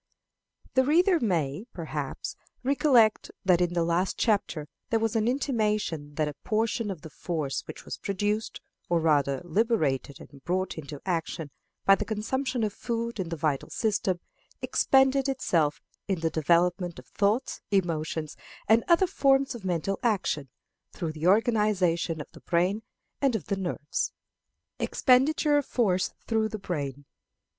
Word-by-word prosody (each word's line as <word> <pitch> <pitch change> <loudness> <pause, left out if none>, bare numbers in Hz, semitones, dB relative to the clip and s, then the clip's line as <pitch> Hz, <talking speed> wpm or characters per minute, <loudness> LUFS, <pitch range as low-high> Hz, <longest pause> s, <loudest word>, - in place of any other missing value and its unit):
The 260 - +4
reader 345 +5 +4
may, 175 - -1
perhaps, 150 -5 -5 0.3
recollect 255 -5 +4 0.2
that 180 -2 +4
in 175 -1 +1
the 170 - +2
last 170 +3 0
chapter 200 -9 0 0.2
there 225 - +2
was 225 0 0
an 220 0 +2
intimation 210 - -1
that 155 -1 +1
a 150 - -4
portion 225 0 0
of 180 -6 -6
the 160 - -8
force 150 -2 -3
which - - -9
was - - -5
produced, 205 +2 -2 0.3
or 170 -1 +3
rather 145 -4 +2
liberated 160 - 0
and 140 -1 -14
brought 185 +2 -1
into 150 -2 -7
action, 165 -4 -2 0.3
by 195 - +8
the - - +1
consumption 250 +3 -2
of 210 -2 -1
food 235 -1 -3
in 180 -3 -2
the 165 - -3
vital 150 -3 -1
system, 205 -5 0 0.4
expended 270 0 +3
itself 165 - +1 0.3
in 190 -5 -1
the 165 -1 0
development 175 +2 +2
of - - -11
thoughts, 210 +6 0
emotions, 160 -5 -1 0.3
and 225 +2 +5
other 345 +2 +5
forms 275 -7 +2
of 235 -4 -9
mental 185 +1 -1
action, 185 - 0 0.4
through 165 -2 -4
the 155 +2 -2
organization 195 -6 +2
of 150 - -6
the - - -15
brain 180 +5 +1 0.4
and 270 -4 +3
of 185 -10 -3
the 200 - -1
nerves. 175 -6 -2 0.7
_Expenditure 290 +3 +3
of 285 - -4
Force 190 -7 +1
through 220 -1 +1
the 215 - -4
Brain. 145 -7 -4
195 Hz, 150 wpm, -28 LUFS, 165-230 Hz, 0.7 s, by